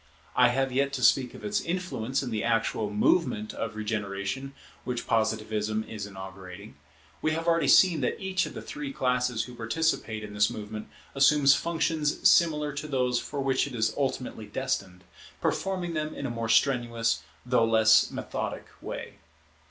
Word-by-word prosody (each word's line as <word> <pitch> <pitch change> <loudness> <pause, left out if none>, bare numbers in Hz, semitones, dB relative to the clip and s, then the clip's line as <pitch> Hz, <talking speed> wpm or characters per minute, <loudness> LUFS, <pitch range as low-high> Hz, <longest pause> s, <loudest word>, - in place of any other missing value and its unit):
I 125 -1 +6
have 135 +2 0
yet 140 +2 +1
to 130 -2 -3
speak 125 +1 +4
of - - -10
its 210 0 0
influence 165 -8 -2
in 125 - -4
the 110 -1 -1
actual 115 -2 0
movement 105 - +1
of 110 -1 -4
regeneration 105 +4 -3 0.3
which 125 -1 -3
Positivism 110 -1 0
is 105 -2 -6
inaugurating. 95 +1 -10 0.5
We 155 - +1
have 165 +1 -3
already 165 0 +3
seen 180 -4 +6
that - - -1
each 190 -2 0
of - - -10
the - - -6
three 290 -1 -6
classes 125 - 0
who 125 - -10
participate 115 -2 -1
in 105 -1 -8
this 105 0 +3
movement, 105 0 -7 0.3
assumes 140 0 +5
functions 160 -2 +1
similar 150 -4 +4
to 145 +2 -5
those 125 -3 +1
for 145 - -4
which 135 0 +1
it 135 - -7
is 110 -1 +1
ultimately 130 -5 -3
destined; 95 -3 -3 0.4
performing 185 -3 -1
them 155 -1 -3
in 140 - -5
a 130 - -2
more 115 -1 -3
strenuous, 115 -3 +2 0.2
though 125 -2 +3
less 110 0 +5
methodic - - -4 0.2
way. - - -7
125 Hz, 165 wpm, -28 LUFS, 110-145 Hz, 0.5 s, I